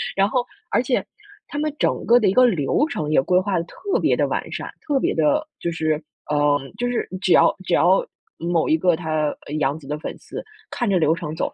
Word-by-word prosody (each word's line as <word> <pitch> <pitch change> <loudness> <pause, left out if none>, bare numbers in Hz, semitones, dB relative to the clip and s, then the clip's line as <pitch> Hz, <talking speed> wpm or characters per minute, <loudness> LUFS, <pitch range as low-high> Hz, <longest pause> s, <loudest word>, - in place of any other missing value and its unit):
然 195 +1 +3
后 250 0 0 0.2
而 245 - +2
且， 250 0 0 0.5
他 290 - -5
们 305 -1 -1
整 - - +1
个 240 +1 +6
的 215 - +2
一 190 - +3
个 255 0 +6
流 180 - +2
程 150 - -3
也 145 - +4
规 180 +6 +3
划 185 -1 -1
得 165 - 0
特 395 - -2
别 - - +3
地 - - +2
完 - - -3
善， - - -5 0.2
特 285 -3 +1
别 - - 0
地 165 - +2
就 170 - -2
是 155 -2 0 0.4
嗯， 145 -2 +1
就 245 0 -1
是 245 - -1
只 180 - +3
要 - - +5
只 180 - -2
要 185 +3 +4 0.3
某 170 -1 0
一 160 - +4
个 175 0 +3
她 155 -2 -1 0.2
呃， 145 - -6
杨 140 +1 0
紫 135 - -14
的 150 +1 -3
粉 - - -6
丝， - - -8 0.3
看 240 - -1
着 190 - +3
流 155 0 +3
程 160 -2 -5
走， - - -2
175 Hz, 255 characters per minute, -22 LUFS, 155-240 Hz, 0.5 s, 个